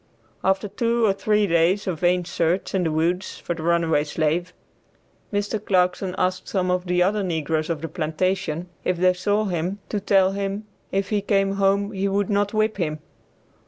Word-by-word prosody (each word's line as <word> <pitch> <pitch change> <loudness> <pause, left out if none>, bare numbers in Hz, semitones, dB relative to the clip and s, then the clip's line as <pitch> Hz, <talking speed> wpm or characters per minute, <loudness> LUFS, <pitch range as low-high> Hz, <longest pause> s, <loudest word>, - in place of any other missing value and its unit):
After 190 +2 +1
two 230 +3 +1
or 200 - +3
three 210 +1 +2
days 170 +2 +2
of 175 -5 -2
vain 180 +1 +2
search 170 +2 -1
in 190 -2 +1
the 160 - +1
woods 170 +4 -1
for - - -3
the 165 - -7
runaway 165 -2 +2
slave, 160 +4 -1 0.8
Mr. 205 +1 -2
Clarkson 180 -1 +1
asked 185 0 -1
some 185 -2 0
of 180 0 -1
the 180 0 +3
other 205 +3 +1
negroes 160 -3 -1
on 165 -3 -2
the 165 - -3
plantation, 170 0 -2 0.2
if 180 - 0
they 185 +1 +4
saw 205 +4 0
him, 180 +1 -2
to 210 - -1
tell 195 -1 +3
him 200 +1 -3 0.3
if 195 0 -1
he 210 -2 +1
came 195 -1 +1
home 200 +1 +2
he 195 -1 -1
would 200 +1 0
not 205 0 +1
whip 215 -1 +1
him. 155 -5 -1
185 Hz, 185 wpm, -23 LUFS, 170-200 Hz, 0.8 s, they